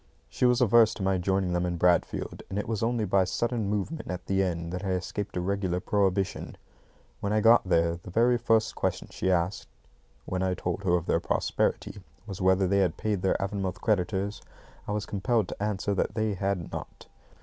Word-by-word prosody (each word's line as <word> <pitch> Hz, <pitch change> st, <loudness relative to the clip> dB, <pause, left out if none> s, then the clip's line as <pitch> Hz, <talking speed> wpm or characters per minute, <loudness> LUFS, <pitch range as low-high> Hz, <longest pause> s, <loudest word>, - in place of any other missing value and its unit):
She 125 Hz, -, +2 dB
was 125 Hz, +1 st, +3 dB
averse 115 Hz, -1 st, +5 dB
to 100 Hz, -, -5 dB
my 95 Hz, -1 st, +1 dB
joining 95 Hz, 0 st, 0 dB
them 90 Hz, 0 st, +1 dB
in 90 Hz, -1 st, -2 dB
Bradfield, 90 Hz, 0 st, +1 dB
and 95 Hz, -, -4 dB
it 105 Hz, -, -2 dB
was 110 Hz, -2 st, -2 dB
only 115 Hz, -1 st, 0 dB
by 100 Hz, 0 st, +2 dB
my -, -, +5 dB
sudden 110 Hz, +3 st, -1 dB
movement 105 Hz, +10 st, -3 dB
at 90 Hz, -, -5 dB
the 95 Hz, 0 st, +1 dB
end 85 Hz, -2 st, -2 dB
that 90 Hz, +1 st, -4 dB
I 95 Hz, -2 st, 0 dB
escaped 95 Hz, +2 st, -4 dB
a -, -, 0 dB
regular 95 Hz, -1 st, -1 dB
prohibition. 95 Hz, 0 st, -1 dB, 0.6 s
When 100 Hz, -, -2 dB
I 110 Hz, -, +3 dB
got 115 Hz, -3 st, +5 dB
there, 85 Hz, -1 st, +2 dB
the 95 Hz, -, -10 dB
very 120 Hz, +5 st, +3 dB
first 115 Hz, -1 st, +2 dB
question -, -, -2 dB
she 95 Hz, -, -2 dB
asked 90 Hz, +1 st, 0 dB, 0.6 s
(when 95 Hz, 0 st, -2 dB
I 95 Hz, -1 st, 0 dB
told 90 Hz, +1 st, -3 dB
her 90 Hz, -1 st, +3 dB
of 85 Hz, -1 st, -1 dB
their -, -, +2 dB
prosperity) 100 Hz, -, -1 dB, 0.2 s
was 100 Hz, -3 st, -7 dB
whether 95 Hz, +1 st, +4 dB
they 100 Hz, +2 st, +2 dB
had 90 Hz, -4 st, +1 dB
paid 105 Hz, -4 st, -1 dB
their 95 Hz, -, +2 dB
Avonmouth 95 Hz, -2 st, -3 dB
creditors. 100 Hz, 0 st, -1 dB, 0.5 s
I -, -, -3 dB
was 105 Hz, 0 st, -2 dB
compelled 105 Hz, +1 st, 0 dB
to -, -, -8 dB
answer 100 Hz, -1 st, -1 dB
that 100 Hz, +1 st, -1 dB
they 110 Hz, -2 st, 0 dB
had 95 Hz, -2 st, -2 dB
not. -, -, -8 dB
95 Hz, 205 wpm, -28 LUFS, 90-105 Hz, 0.6 s, averse